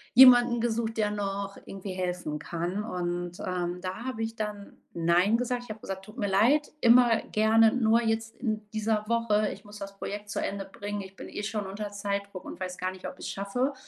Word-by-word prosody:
jemanden 245 -2 +8
gesucht, 225 -1 -1
der 210 -1 +1
noch 200 -1 -3
irgendwie 195 -1 -6
helfen 180 -5 -3
kann. 175 +6 -3
Und, 175 -3 -3
ähm, 180 -1 -2
da 190 +6 -5
habe 240 -4 -3
ich 225 0 -3
dann 210 -2 -5 0.2
Nein 175 +6 +3
gesagt, 245 0 -1
ich - - -17
habe 215 0 -6
gesagt: 195 0 -6
„Tut 215 +5 -13
mir 205 - 0
leid, 235 +10 +3
immer 235 -1 +6
gerne, 220 +1 +5
nur 230 -1 +4
jetzt 225 0 -1
in 215 -3 -2
dieser 215 0 0
Woche, 215 -3 +2
ich 200 - -13
muss 205 0 -11
das 200 0 -8
Projekt 205 0 -5
zu - - -1
Ende 195 -1 -3
bringen. 205 +1 -5
Ich 190 0 -11
bin - - -9
eh 205 - -5
schon 210 -2 -2
unter 205 +2 -5
Zeitdruck 200 -1 -4
und - - -8
weiß 185 -1 -4
gar 185 0 -1
nicht, 185 0 -8
ob - - -7
ich - - -5
es - - -3
schaffe.“ 245 +8 -1
205 Hz, 210 wpm, -28 LUFS, 190-225 Hz, 0.2 s, jemanden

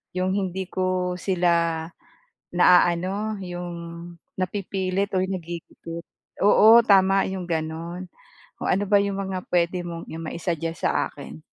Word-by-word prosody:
yung 185 +1 0
hindi 190 -1 -2
ko 185 -1 -1
sila 170 -3 +1 0.7
naaano, 180 +4 +3
yung 175 -1 -5 0.7
napipilit 195 +1 -2
or 185 - +2
nagigipit. 170 -2 -7 0.4
Oo, 220 +3 +8
tama, 195 -2 +4
yung 190 -1 -4
gano'n. 165 +2 -4 0.5
Oh, - - -2
ano 200 +3 +2
ba 205 0 +4
'yong 200 -1 -2
mga 190 -1 -3
puwede 175 +1 +1
mong 170 -1 -6
i - - -6
ma-i-suggest 165 0 -3
sa - - +1
akin? 80 - -11
180 Hz, 125 wpm, -24 LUFS, 170-195 Hz, 0.7 s, Oo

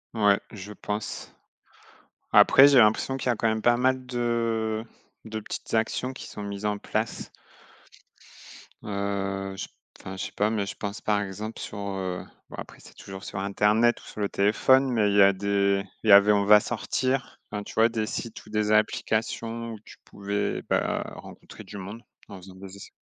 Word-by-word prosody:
Ouais, 105 -2 +4
je 105 -1 -9
pense. 105 0 -5 1.0
Après, 135 +1 +8
j'ai 140 -2 +6
l'impression 115 +4 +3
qu'il 135 - -6
y - - +4
a - - -3
quand 115 - +1
même 110 0 -1
pas 120 0 +4
mal 130 +1 +1
de 115 -2 -1 0.4
de 110 0 -4
petites 105 - -7
actions 115 +3 0
qui - - -9
sont 105 - -8
mises 100 0 -6
en 105 0 0
place - - -3 1.5
heu, 100 -1 -3
je - - -5
p - - -32 0.3
enfin, 95 - -8
je 95 - -4
sais - - -13
pas 105 +1 +1
mais 110 -2 -1
je 100 - -6
pense, 100 +1 -5
par 105 -1 +1
exemple, 105 +3 -6
sur, - - -7
heu, 95 -2 -4 0.3
bon, - - -9
après, - - -9
c'est - - -16
toujours 95 0 -10
sur 95 - -5
internet 105 +4 +2
ou - - -17
sur 105 - -8
le 100 - 0
téléphone. 130 +7 +3
Mais 110 -4 +2
il 100 - 0
y - - +7
a 100 0 +7
des 100 0 +1 0.2
il 110 - 0
y - - +9
avait 100 +1 +8
on 100 -1 +3
va 105 +1 +7
sortir, 130 +3 -2
enfin, 105 0 -4
tu - - -10
vois? 115 +1 +4
Des 110 -2 -2
sites 115 +1 -6
ou - - -15
des 105 0 0
applications 115 +2 0
où 110 - -9
tu - - -14
pouvais, 100 0 -3
bah, - - 0
rencontrer - - -12
du 105 - -9
monde 100 +4 -8 0.3
en 100 - -9
faisant 95 0 -13
des 95 +1 -11
es 100 - -11
105 Hz, 200 wpm, -26 LUFS, 100-115 Hz, 1.5 s, y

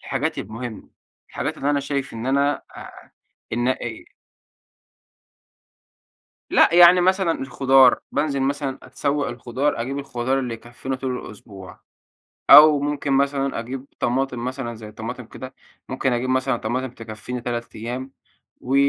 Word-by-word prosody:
الحاجات - - -2
المهمة، 115 +2 -7 0.4
الحاجات - - -4
اللي 145 - -1
أنا 145 - +1
شايف 140 -1 -3
إن 115 +2 -6
أنا 140 +2 +1
آآ، - - -12 0.4
إن 120 +2 0
إي 120 -3 -3 2.5
لأ 170 - +5
يعني 175 +1 +8
مثلًا 185 -1 +2
الخضار 135 -1 +4
بانزل 145 -1 0
مثلًا 140 0 -2
أتسوّق 145 0 -2
الخضار، 125 +3 -2
أجيب 135 +4 -3
الخضار 130 -1 -2
اللي 125 -3 -3
يكفينا 120 +3 -6
طول 130 -1 -3
الأسبوع، 100 -3 -12 0.7
أو 150 -1 +9
ممكن 145 -1 -2
مثلًا 140 -1 +1
أجيب 130 +3 -6
طماطم 125 -1 -1
مثلًا 130 -2 -4
زي 110 -1 -10
طماطم 115 +3 -6
كده، 130 +3 -10 0.3
ممكن 130 0 -1
أجيب 120 +2 -1
مثلًا 130 -1 +1
طماطم 125 +4 -2
تكفيني 115 +1 -7
3 120 0 -5
أيام، 125 +4 -5 0.5
و 130 +2 -3
130 Hz, 135 wpm, -22 LUFS, 120-140 Hz, 2.5 s, أو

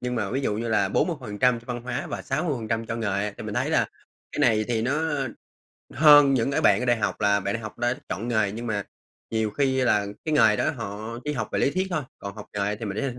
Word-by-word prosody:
nhưng 125 0 -2
mà 105 -4 -1
ví 130 - -1
dụ 105 - 0
như 115 +1 -3
là 105 -3 +2
40% 125 - +1
cho - - -20
văn 120 -2 -4
hóa 125 - -3
và - - -5
60% 115 -8 -2
cho 115 - -3
nghề, 105 -2 -1
thì - - -7
mình - - -5
thấy - - 0
là - - +3 0.5
cái - - -6
này 110 -2 +3
thì 115 -2 0
nó 140 +6 0 0.9
hơn 145 -1 +7
những 125 +1 +1
cái 140 - +1
bạn 100 - +4
ở 125 - -2
đại 120 -1 +4
học - - -2
là 100 -1 +3
bạn 100 +2 -2
đại 115 - -4
học 110 +2 -8
đã 120 +1 +1
chọn 115 +4 -4
nghề, 110 -4 +1
nhưng 115 +3 -6
mà 105 -3 -1 0.5
nhiều 110 -1 0
khi 130 +3 +1
là 105 -5 +2 0.2
cái 155 -1 0
nghề 105 -7 +5
đó - - +1
họ 110 +4 -6
chỉ 150 - -1
học 110 -6 -3
về - - 0
lý 140 - +3
thuyết 185 +3 -1
thôi, 165 -4 -1 0.2
còn 100 0 -7
học 105 - -8
nghề 105 +1 -1
thì 115 - -6
mình 120 +5 -3
115 Hz, 255 wpm, -25 LUFS, 105-130 Hz, 0.9 s, hơn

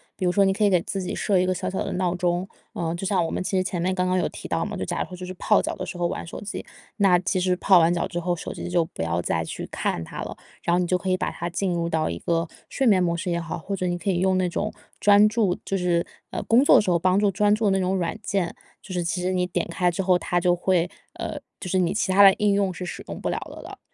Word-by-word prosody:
比 - - -6
如 180 - +3
说 200 +2 +4
你 195 - +3
可 210 - -1
以 205 - +5
给 180 -3 +3
自 195 - -3
己 180 - -4
设 200 -3 +1
一 180 - +2
个 185 - +1
小 - - -3
小 190 - -2
的 - - -4
闹 180 -1 0
钟， 180 +1 0 0.2
呃， 165 -1 -2
就 175 - -5
像 190 -3 +2
我 - - -3
们 - - -2
其 195 0 -1
实 185 - +2
前 180 -2 -2
面 185 +2 +1
刚 185 0 0
刚 185 0 +1
有 - - 0
提 - - -8
到 - - 0
嘛， - - -4
就 - - -3
假 - - -2
如 - - -1
说 180 - -8
就 180 - -7
是 185 - -6
泡 210 +3 +2
脚 - - -3
的 185 - -5
时 185 0 -7
候 175 0 +1
玩 - - -4
手 165 - -7
机， 205 - -6 0.3
那 195 -4 +4
其 185 +2 -1
实 180 0 +2
泡 190 0 +5
完 165 +1 +4
脚 175 - -1
之 - - -6
后， 175 +1 0
手 175 - -5
机 - - -6
就 175 -2 +2
不 120 - -6
要 85 +1 0
再 80 -1 -1
去 80 - -6
看 - - -2
它 80 - -7
了， - - -6 0.3
然 170 - +1
后 175 - +3
你 180 - 0
就 180 - +2
可 185 +1 -4
以 185 - +2
把 - - -1
它 170 - -4
进 180 +1 -1
入 170 -1 -1
到 160 -1 0
一 85 - -3
个 165 - 0 0.2
睡 270 - 0
眠 190 -5 +5
模 170 -1 0
式 180 +2 -3
也 170 0 0
好， 165 - -5
或 195 +5 -4
者 185 -1 -2
你 175 0 -1
可 175 +3 -3
以 180 -2 +1
用 190 0 +2
那 185 -1 +1
种 205 +5 -2 0.3
专 205 +1 +7
注 210 -4 +1
就 195 - -1
是 175 -2 +1 0.3
呃， - - -3
工 235 +4 +4
作 - - +6
的 - - +7
时 205 - -2
候 175 - +4
帮 185 +3 +3
助 205 -1 +3
专 205 +2 +3
注 220 +1 -1
的 200 - +4
那 195 - +2
种 185 +1 0
软 175 0 -1
件， 195 -4 -1 0.3
就 190 - -8
是 175 -1 -1
其 175 +2 -1
实 180 +1 0
你 180 -1 +1
点 180 -1 -2
开 175 +1 +1
之 175 +3 -2
后， 180 -1 +3
它 175 0 0
就 175 0 +3
会 175 -1 +1 0.3
呃， - - -5 0.2
就 - - -6
是 185 - +2
你 175 -2 +2
其 205 -2 0
他 195 +2 +5
的 195 -1 +10
应 210 -1 +2
用 200 -1 +1
是 180 - -6
使 175 - -6
用 - - -6
不 - - -2
了 - - -1
的 - - -10
了。 - - -10
180 Hz, 345 characters per minute, -24 LUFS, 175-195 Hz, 0.3 s, 的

